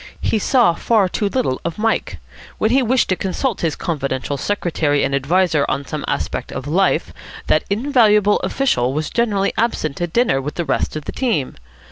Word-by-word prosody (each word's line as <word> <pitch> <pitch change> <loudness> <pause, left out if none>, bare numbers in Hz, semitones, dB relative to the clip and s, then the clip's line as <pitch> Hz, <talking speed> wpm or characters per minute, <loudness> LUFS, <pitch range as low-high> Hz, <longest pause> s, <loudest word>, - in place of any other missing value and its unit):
He 220 - 0
saw 235 -4 +3
far 205 +3 +2
too 200 +2 -1
little 220 - -1
of 170 - -4
Mike. 225 +1 -1 0.4
When 220 - +1
he 265 +2 +4
wished 255 +1 +2
to 185 - +2
consult 195 +6 -2
his 165 -3 0
confidential 140 -4 -3
secretary 155 -4 0
and 140 - -1
adviser 155 +2 +2
on 140 - -2
some 150 +1 -5
aspect - - -3
of 135 - -5
Life, 180 +6 +1 0.3
that - - +2
invaluable 210 -3 +3
official 130 - 0
was 155 0 -2
generally 205 -4 +1
absent 175 -10 -1
at 175 -1 -2
dinner 225 - +2
with 150 +2 -5
the 170 - -2
rest 135 - -1
of 155 -2 -5
the - - -4
team. 220 - -1
185 Hz, 180 wpm, -19 LUFS, 145-225 Hz, 0.4 s, he